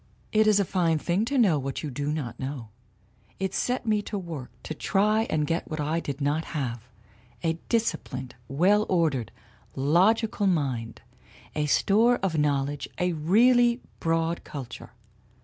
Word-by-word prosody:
"It 215 0 +4
is 210 -1 +5
a 200 - +2
fine 170 -4 +1
thing 175 +7 0
to 275 +3 -1
know 190 - +4
what 135 +3 -4
you 150 - -4
do 145 +3 -2
not 150 -6 -4
know. 130 -4 -5 0.7
It 190 0 -2
set 250 0 -1
me 215 -2 +2
to 205 0 -5
work 165 -9 -6
to - - -4
try 210 +6 +1
to - - -1
get 165 +2 -2
what 155 - -4
I 155 +3 0
did 140 -4 -5
not 145 +3 0
have 120 -4 -4 0.5
a 165 0 0
disciplined, 135 - -1
well 190 +10 +3
ordered, 150 - +1 0.4
logical 195 - +2
mind, 130 -10 -1 0.5
a 150 -1 -1
store 220 - +4
of 185 -4 0
knowledge, 145 -1 0
a 180 0 0
really 235 +9 +4 0.2
broad 165 +1 0
culture. 135 -5 -8
165 Hz, 155 wpm, -26 LUFS, 145-205 Hz, 0.7 s, is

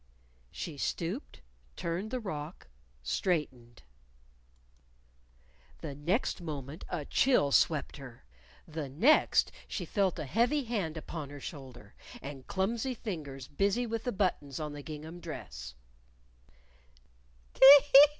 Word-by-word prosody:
She 150 - -6
stooped 180 - -3 0.3
turned 175 +6 -3
the 255 +1 -2
rock 160 -6 -6 0.4
straightened. 125 - -2 2.0
The 155 -4 -5
next 175 - -1
moment 150 -2 -6
a 160 -5 -3
chill 245 - +3
swept 150 +1 +2
her; 125 - -12 0.4
the 155 -3 -5
next, 225 - +4 0.2
she - - -4
felt 195 -4 +1
a - - -4
heavy 240 - +2
hand 200 -10 -2
upon 155 -2 -6
her 145 0 -9
shoulder, 130 -7 -9 0.3
and 135 -1 -9
clumsy 230 +7 -1
fingers 145 - -6
busy 200 +10 +1
with 225 -1 -3
the 245 - 0
buttons 180 - -1
on 150 -1 -4
the 145 - -7
gingham 155 +3 -8
dress. - - -8
160 Hz, 110 wpm, -31 LUFS, 140-200 Hz, 2.0 s, next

